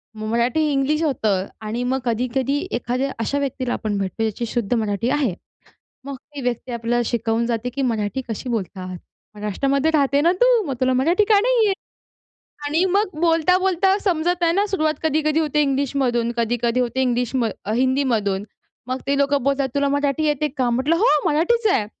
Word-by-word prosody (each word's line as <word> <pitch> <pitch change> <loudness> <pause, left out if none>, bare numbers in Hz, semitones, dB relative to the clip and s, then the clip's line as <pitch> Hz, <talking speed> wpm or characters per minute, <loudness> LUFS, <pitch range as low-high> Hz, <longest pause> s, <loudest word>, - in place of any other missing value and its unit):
मग 215 0 -5
मराठी 235 +6 +1
इंग्लिश 285 +3 +1
होतं 215 -10 0 0.2
आणि 230 +3 -2
मग 260 +2 0
कधी-कधी 255 +4 0
एखाद्या 250 +3 -1
अशा 280 +5 -1
व्यक्तीला 260 -3 -2
आपण 210 -2 -2
भेटतो 195 +3 -2
ज्याची 220 +2 -2
शुद्ध 235 -1 -1
मराठी 220 0 0
आहे. 265 -7 +1 0.7
मग 280 0 -6
ती 290 +1 -10
व्यक्ती 245 0 -3
आपल्याला 235 +1 0
शिकवून 230 0 0
जाते 235 +1 -2
की, 275 +3 -4
"मराठी 230 0 -1
कशी 230 +3 -4
बोलत 200 -6 -3
आहात. 185 -1 -6 0.4
महाराष्ट्रामध्ये 275 +9 0
राहते 280 -2 +2
ना 335 +3 +4
तू? - - +5
मग 275 - -1
तुला 255 0 +3
मराठी 330 +11 +3
का 420 -2 +6
नाही 475 +1 +3
येत?" 390 - +1 0.9
आणि 315 +5 +2
मग 400 -6 0
बोलता-बोलता 360 +3 +3
समजत 350 -1 0
आहे 335 -1 +3
ना, 400 +4 +2
सुरवात 315 -6 0
कधी-कधी 310 0 +1
होते 300 -1 +1
इंग्लिशमधून 265 -4 0
कधी-कधी 235 +1 0
होते 250 +1 -1
इंग्लिश 245 -1 0
म 255 -3 +1 0.3
हिंदीमधून. 240 -7 +1 0.4
मग 255 +1 -2
ते 280 - +1
लोकं 280 -1 +2
बोलतात, 275 0 +1
"तुला 280 0 +2
मराठी 285 +1 0
येते 300 0 +1
का?" 255 -2 +1
म्हटलं, 265 +7 +1
"हो, 390 - +1 0.2
मराठीच 350 +10 +2
आहे" 210 - +1
265 Hz, 175 wpm, -21 LUFS, 235-305 Hz, 0.9 s, का